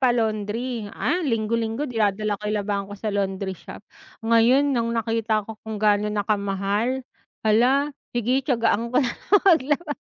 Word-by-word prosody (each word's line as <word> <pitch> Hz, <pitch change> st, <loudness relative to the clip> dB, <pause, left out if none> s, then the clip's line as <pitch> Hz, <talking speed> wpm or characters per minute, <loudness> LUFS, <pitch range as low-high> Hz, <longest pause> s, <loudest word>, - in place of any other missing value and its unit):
pa-laundry 230 Hz, -1 st, 0 dB
ah, 355 Hz, -, -1 dB
linggo-linggo 230 Hz, -1 st, -1 dB
dinadala 215 Hz, -4 st, 0 dB
ko 210 Hz, -, -4 dB
yung 210 Hz, -, 0 dB
labahan 200 Hz, -1 st, -2 dB
ko 205 Hz, -, -7 dB
sa 210 Hz, +1 st, -3 dB
laundry 195 Hz, -1 st, -2 dB
shop. 185 Hz, -, -11 dB, 0.4 s
Ngayon 240 Hz, +5 st, +4 dB
nang 235 Hz, -3 st, 0 dB
nakita 225 Hz, -2 st, 0 dB
ko 220 Hz, 0 st, -10 dB
kung 220 Hz, -1 st, -6 dB
gaano 210 Hz, 0 st, +2 dB
na 210 Hz, -1 st, -1 dB
kamahal, 205 Hz, +5 st, -1 dB, 0.4 s
hala 255 Hz, +7 st, +3 dB, 0.2 s
sige, 245 Hz, +3 st, +2 dB
tiyagaan 235 Hz, -3 st, +1 dB
ko 255 Hz, +3 st, +2 dB
na 245 Hz, -, -1 dB
lang 410 Hz, 0 st, +1 dB
maglaba. 300 Hz, -3 st, +3 dB
225 Hz, 155 wpm, -24 LUFS, 210-250 Hz, 0.4 s, Ngayon